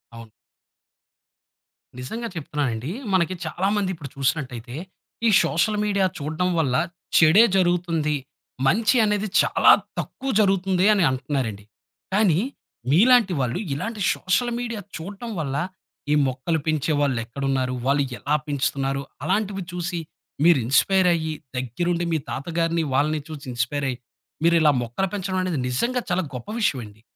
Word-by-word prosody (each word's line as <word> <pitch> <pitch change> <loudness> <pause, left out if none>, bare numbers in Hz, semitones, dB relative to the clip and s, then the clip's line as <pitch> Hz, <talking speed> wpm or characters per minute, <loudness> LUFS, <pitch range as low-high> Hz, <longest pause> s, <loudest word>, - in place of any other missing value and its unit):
అవును. 115 -1 -11 1.7
నిజంగా 225 - -5
చెప్తున్నానండి. 140 -4 -3 0.2
మనకి 185 0 +2
చాలామంది 195 +4 0
ఇప్పుడు 150 -5 -8
చూసినట్టయితే. 130 -3 -2 0.5
"ఈ - - +6
సోషల్ 170 +9 +1
మీడియా 200 -2 +2
చూడడం 155 +5 -1
వల్ల 135 -6 +1 0.4
చెడే 165 +7 +7
జరుగుతుంది. 170 -4 +1 0.5
మంచి 215 - +3
అనేది 210 0 0
చాలా - - +5 0.3
తక్కువ 270 - -5
జరుగుతుంది." 190 -2 +2
అని 200 -3 +2
అంటున్నారండి. 130 -6 -3 0.5
కానీ 190 -5 +3 0.5
మీలాంటి 220 - +5
వాళ్ళు 125 +6 -1
ఇలాంటి 215 +9 -4
సోషల్ 240 +6 0
మీడియా 230 -3 -4 0.2
చూడటం 200 +7 -7
వల్ల 140 -4 -2 0.6
ఈ - - +5
మొక్కలు 130 +6 -1
పెంచే 155 -1 0
వాళ్ళెక్కడున్నారు? 130 0 -1
వాళ్ళు 140 +1 +3
ఎలా 145 +2 0
పెంచుతున్నారు? 140 -1 -1 0.2
అలాంటివి 195 +3 -1
చూసి 175 0 -3 0.4
మీరు 170 -3 +6
ఇన్స్పైర్ 185 +9 +3
అయ్యి 160 -2 -2 0.2
దగ్గరుండి 170 +8 -1
మీ 160 - +2
తాతగారిని 165 +3 -1
వాళ్ళని 150 +3 +2
చూసి 155 -2 -8
ఇన్స్పైర్ 125 +4 -1
అయ్యి. 125 - -3 0.5
మీరిలా 165 -2 +5
మొక్కలు 120 +11 -2
పెంచడం 190 -2 -2
అనేది 180 -6 -1
నిజంగా 240 - 0
చాలా 180 +1 +1
గొప్ప 125 -2 -7
విషయండి. 110 - -2
160 Hz, 125 wpm, -23 LUFS, 135-190 Hz, 1.7 s, చెడే